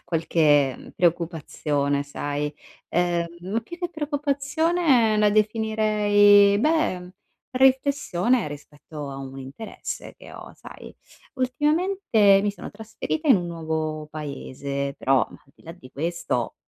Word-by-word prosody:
qualche, 150 -5 +2
mhmm, - - -13
preoccupazione, 155 -4 0
sai. 145 +1 -4 0.3
Ehm, 175 -1 0 0.2
ma 225 +3 0
più 290 +10 -10
che 350 -1 -3
preoccupazione 290 -3 +1
la 210 0 +4
definirei, 210 -2 +4
beh, 215 - 0 0.4
riflessione 255 - +2
rispetto 145 0 -9
a 135 - -7
un 135 0 -8
interesse 135 +12 -8
che - - -14
ho, - - -11
sai. - - -12 0.4
Ultimamente 260 - +2
mi 205 - +1
sono 200 - -9
trasferita 225 +8 -4
in 260 - +7
un 175 -2 -3
nuovo 160 -2 -3
paese, 140 -2 -5
però, 135 0 +2
mhmm, - - -14
al 135 - -27
di - - -23
là 165 - -8
di 170 -7 -15
questo, 155 -6 -3
185 Hz, 125 wpm, -24 LUFS, -, 0.4 s, in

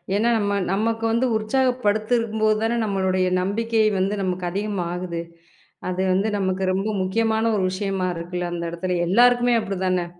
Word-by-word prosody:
ஏன்னா 225 +3 +2
நம்ம 200 -1 0
நமக்கு 225 +3 0
வந்து 235 +3 +2
உற்சாகப்படுத்திருக்கும்போது 220 -2 +1
தான, 235 +1 +1
நம்மளுடைய 190 -2 0
நம்பிக்கை 225 +3 0 0.2
வந்து 195 +2 0
நமக்கு 180 -1 -2
அதிகமா 200 -2 -2
ஆகுது. 175 -2 -4 0.7
அது 185 +1 -2
வந்து 195 +3 +1
நமக்கு 190 -1 -1
ரொம்ப 195 +3 -1
முக்கியமான 220 +3 +1
ஒரு 190 - 0
விஷயமா 195 -1 -2
இருக்குல, 175 +1 -4
அந்த 170 0 -4
இடத்துல 180 +1 -2
எல்லாருக்குமே 245 +4 +4
அப்டிதான? 185 -3 -1
200 Hz, 140 wpm, -23 LUFS, 185-225 Hz, 0.7 s, எல்லாருக்குமே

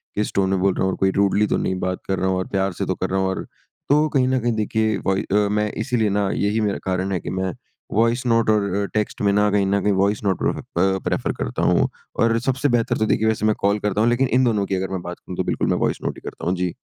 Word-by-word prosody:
किस 105 +1 -1
टोन 95 -1 +1
में 95 -1 +1
बोल 95 0 +2
रहा - - -1
हूँ 95 - +1
और - - -4
कोई 95 0 +2
रूडली 100 +2 +2
तो - - +1
नहीं 95 - -1
बात 95 0 -2
कर 95 -1 -1
रहा 95 - 0
हूँ 95 - 0
और 95 - -2
प्यार 95 -1 -1
से - - 0
तो - - -1
कर - - -3
रहा 95 - 0
हूँ। 95 - +1
और 95 - -3 0.5
तो 150 +2 +4
कहीं 130 -3 +2
न 130 0 +1
कहीं 120 0 0
देखिए 110 0 0
वही 95 0 +1
अ, 100 - -2 0.2
मैं 105 0 0
इसीलिए 115 -5 0
ना 100 -1 0
यही 105 +2 0
मेरा 105 -2 0
कारण 95 +1 -1
है 95 - 0
कि - - -6
मैं 95 -1 -1 0.4
वॉइस 115 +3 +2
नोट 115 -2 +2
और 105 -1 +3
अ, 100 0 0
टेक्स्ट 105 0 -2
में 100 -1 +3
ना 105 +1 +3
कहीं 100 -1 +2
ना 100 0 +1
कहीं 105 0 +2
वॉइस 105 +1 0
नोट 95 -3 +1
प्रेफ - - +1
अ, 95 +2 0
प्रेफ़र - - -1
करता - - -2
हूँ - - +3 0.3
और 115 0 +3
सबसे 135 +3 0
बेहतर 115 - 0
तो 110 - +1
देखिए 110 0 +1
वैसे 110 -1 0
मैं 110 - +3
कॉल 100 +1 +1
करता 105 +1 0
हूँ। 115 - +4
लेकिन 130 +2 +2
इन 130 - +4
दोनों 105 -5 +1
की 95 - -2
अगर 95 0 -2
मैं 95 -2 -3
बात 90 0 -7
करूँ 90 - -9
तो - - +1
बिल्कुल - - -1
मैं - - +2
वॉइस - - -2
नोट - - -3
ही - - -12
करता - - -10
हूँ। 90 - +1
जी। 90 -1 -2
100 Hz, 295 wpm, -22 LUFS, 95-110 Hz, 0.5 s, तो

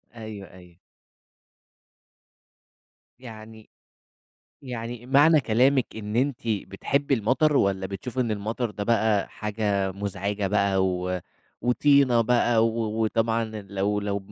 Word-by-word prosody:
أيوه، 110 -5 -9
أيوه. 90 -2 -16 2.4
يعني 110 -2 -12 0.9
يعني 120 -1 -6
معنى 145 +3 +5
كلامِك 130 +2 +2
إن 105 +1 -5
أنتِ 135 0 +1
بتحبي 135 +7 -1
المطر 135 +7 +2
والَّا 95 -3 +1
بتشوفي 120 +7 -5
إن 115 -3 0
المطر 110 +3 -2
ده 105 -1 -5
بقى 110 -3 +1
حاجة 100 -3 -2
مزعجة 100 +1 -3
بقى، 100 -1 +1
و 90 0 -2 0.4
وطينة 130 -1 +3
بقى 120 -1 +3
و 110 -1 -2
وطبعًا 115 +1 0 0.2
لو 100 +1 -1
لو 100 0 -2
110 Hz, 110 wpm, -25 LUFS, 100-120 Hz, 2.4 s, معنى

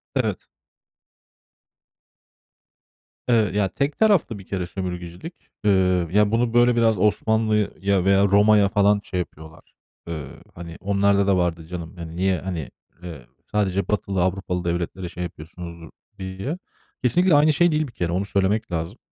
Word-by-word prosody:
Evet. - - -1 2.8
Eee, 115 -3 +4
ya, 100 -2 +2
tek 140 +7 -2
taraflı 195 - +3
bir 95 - -12
kere 95 -3 -2
sömürgecilik. 90 - -6 0.3
Eee, 95 -3 +3
ya, 105 +2 +3
bunu 115 0 +1
böyle 120 0 +4
biraz 115 -2 +3
Osmanlı'ya 105 -2 +1
veya 100 +1 +4
Roma'ya 105 +1 +5
falan 100 0 +3
şey 90 - -4
yapıyorlar. 80 -2 -9 0.3
Eee, 80 -5 -5 0.3
hani 85 -1 -9
onlarda 100 +1 +2
da 95 - +3
vardı 85 -2 -1
canım. 85 -1 -7
Hani, 85 -1 -8
niye, 95 0 +1
hani, 90 -6 -5 0.3
eee, 80 -8 -8 0.3
sadece 100 -3 0
batılı, 100 -3 -1
Avrupalı 90 -1 -2
devletlere 85 +1 -3
şey 90 0 -6
yapıyorsunuz 85 0 -9 0.3
diye. 95 - -4 0.5
Kesinlikle 170 +8 +4
aynı 150 +1 +5
şey 175 +4 +3
değil 155 -1 0
bir 125 - -12
kere 85 -4 -2
onu 95 +3 -1
söylemek 100 +2 0
lazım. 85 +6 -3
95 Hz, 140 wpm, -23 LUFS, 90-105 Hz, 2.8 s, Roma'ya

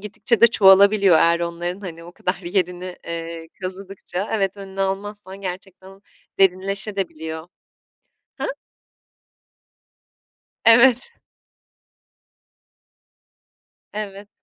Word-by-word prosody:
gittikçe 210 +3 -1
de 235 - +9
çoğalabiliyor 200 -3 +6
eğer 170 +1 +3
onların 175 +2 -4
hani 170 -4 -8
o 175 - -12
kadar 180 +1 -3
bir 175 - -7
yerini, 180 -1 -2
eee, 165 0 -6
kazıdıkça. 190 0 -5
Evet, 200 -2 0
önünü 195 -1 -8
almazsan 195 0 -4
gerçekten 190 +1 -8 0.4
derinleşebiliyor 190 -4 -1 1.0
da. - - -3
Hı? - - 0 2.2
Evet. 240 - +6 2.8
Evet. 205 -1 -7
190 Hz, 85 wpm, -21 LUFS, 175-200 Hz, 2.8 s, de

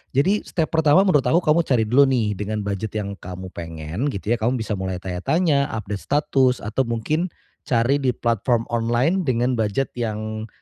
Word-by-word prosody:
jadi 190 +10 +3
step 160 -3 -1
pertama 160 +3 +4
menurut 145 -7 +4
aku 170 - +4
kamu 155 +2 +3
cari 120 -4 +3
dulu 135 +5 +5
nih 115 -6 +1
dengan 105 0 -3
budget 100 +2 -4
yang 100 -2 -3
kamu 90 +1 -8
pengen 80 - -4
gitu 105 +2 -4
ya, - - -5
kamu 120 +4 +1
bisa 110 -1 -2
mulai 95 -1 -3
tanya-tanya, 140 - +1
update 105 -2 -5
status, 135 -3 +2
atau 110 +5 0
mungkin 150 +10 -1 0.4
cari 125 +4 +2
di 130 -2 +2
platform 115 0 +1
online 120 +11 +1
dengan 125 0 +1
budget 110 +5 0
yang, 110 -1 -4
115 Hz, 175 wpm, -22 LUFS, 105-140 Hz, 0.4 s, dulu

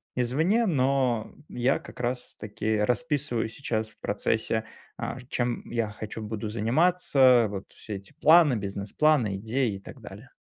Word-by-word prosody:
извне, 160 - +2
но 130 - +1 0.2
я 125 +3 +1
как - - -13
раз-таки 120 -3 -2
расписываю 125 +1 0
сейчас 110 -3 -3
в - - -20
процессе, 110 +1 -1 0.3
а, 115 - -4
ж 125 - -11
чем 120 -1 -1
я 115 -2 0
хочу, 110 +1 -7
буду 110 0 -4
заниматься, 140 - +1 0.3
э. - - 0
Вот 100 -1 -7
все 105 - -8
эти 95 +6 -10
планы, 160 -1 +6
бизнес-планы, 105 +3 +1
идеи 115 +2 -1
и - - -12
так 115 - -12
далее. 110 +3 -11
120 Hz, 150 wpm, -27 LUFS, 110-135 Hz, 0.3 s, планы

